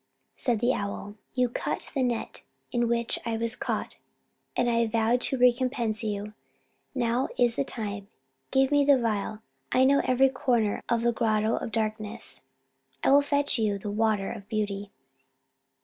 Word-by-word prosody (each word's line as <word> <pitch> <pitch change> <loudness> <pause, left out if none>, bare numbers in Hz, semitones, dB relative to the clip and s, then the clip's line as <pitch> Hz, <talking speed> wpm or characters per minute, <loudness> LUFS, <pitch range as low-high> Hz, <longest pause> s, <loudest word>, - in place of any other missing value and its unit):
Said 235 -4 0
the 245 +2 +3
owl: 200 0 -4 0.2
"You 250 -1 +3
cut 240 - -4
the 275 - 0
net 240 -3 -2 0.3
in 240 -1 +1
which 235 0 0
I 230 -1 -2
was 230 +1 0
caught, - - -3 0.6
and 245 - +2
I 235 -1 +2
vowed 230 +2 +2
to 265 - +1
recompense 245 -3 +2
you. 210 0 -3 0.6
Now 245 0 +1
is 240 -2 +3
the - - +1
time. 205 -6 -5 0.4
Give 270 +1 +3
me 290 -1 +5
the 280 -1 +6
phial: 220 -1 -2 0.3
I 255 - +4
know 280 +2 +5
every 260 +1 +4
corner 240 -5 0
of 235 -1 +1
the 240 - +3
Grotto 220 -1 +1
of - - -4
Darkness 215 0 -3 0.6
I - - +4
will 285 +1 +7
fetch 285 -2 +1
you 210 -2 +1
the 205 +1 -5
water 215 -2 +1
of 205 -4 -9
beauty." 205 -2 -2
230 Hz, 165 wpm, -27 LUFS, 215-250 Hz, 0.6 s, will